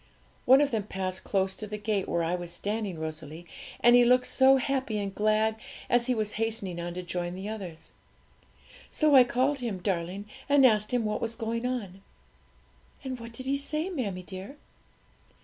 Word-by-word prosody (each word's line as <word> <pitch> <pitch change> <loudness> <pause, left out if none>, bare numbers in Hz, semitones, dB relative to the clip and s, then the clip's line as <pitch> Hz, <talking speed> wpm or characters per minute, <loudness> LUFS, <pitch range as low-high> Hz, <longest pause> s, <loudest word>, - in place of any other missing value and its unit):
One 265 +3 +7
of 290 - +1
them 215 -3 -2
passed 185 -1 -3
close 190 -1 0
to 215 - -6
the 210 +1 -5
gate 210 -2 -1
where 170 - 0
I 165 +2 0
was 175 -1 -4
standing, 205 0 -3
Rosalie, 160 +1 -6 0.4
and 240 0 +7
he 245 - +7
looked 250 +1 +4
so 265 0 +5
happy 260 -4 -1
and 200 -1 -3
glad, 215 +1 +2 0.3
as 245 0 +3
he 250 - +2
was 215 -2 -1
hastening 200 -6 -2
on 175 0 -5
to 180 - -4
join 175 0 -3
the 190 +2 -6
others. 190 -7 -7 1.0
So 305 -2 +2
I 260 -2 +9
called 260 +3 0
him, 235 -6 -3
darling, 185 +1 -2 0.2
and 280 -2 +6
asked 215 -3 +3
him 245 -3 +1
what 210 0 -2
was 230 0 -2
going 230 +2 -2
on.' 200 -7 -4 1.0
'And 260 -2 -5
what 230 0 -9
did 255 +3 -6
he 275 +1 +1
say, 305 +6 -2
mammie 200 - -3
dear?' 190 +9 -9
215 Hz, 185 wpm, -28 LUFS, 185-250 Hz, 1.0 s, I